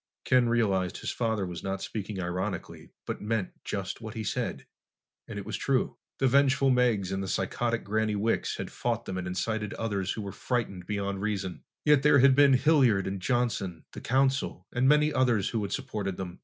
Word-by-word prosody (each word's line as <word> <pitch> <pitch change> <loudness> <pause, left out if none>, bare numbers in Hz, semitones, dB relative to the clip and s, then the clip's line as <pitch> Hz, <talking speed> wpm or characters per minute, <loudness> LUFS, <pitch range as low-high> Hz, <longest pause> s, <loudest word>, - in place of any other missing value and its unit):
Ken 125 -2 +4
realized 100 -6 +1
his - - -3
father 110 -4 -1
was 90 -2 -6
not 95 0 -3
speaking 105 -1 -5
ironically 90 +1 -4 0.2
but - - -4
meant 105 -3 -1
just 100 +1 -4
what 110 0 -7
he 110 - -3
said. - - -3 0.6
And - - -7
it 100 - -5
was 105 -1 -3
true. 130 +1 0 0.2
The 135 - +2
vengeful 135 0 +4
Meggs 120 -7 +2
and 95 0 -1
the 95 - -4
psychotic 115 +5 -1
Granny 110 +1 0
Wicks 110 +3 0
had - - -5
fought 115 -1 -2
them 95 -1 -3
and 90 - -4
incited 105 +3 -2
others 100 -5 -2
who 110 - -5
were 100 - -5
frightened 100 -4 -3
beyond 100 -2 -2
reason. 100 -4 -3 0.2
Yet 150 -2 +5
there 145 0 +6
had 135 0 +6
been 140 -1 +6
Hilliard 130 -8 +4
and 95 0 -3
Johnson, 100 -6 -1
the - - -9
Council, 135 +2 +1
and 130 +2 +3
many 150 0 +4
others 120 -7 +2
who 115 - -1
had 100 - -3
supported 100 -3 -3
them. 90 -2 -6
110 Hz, 195 wpm, -28 LUFS, 95-125 Hz, 0.6 s, there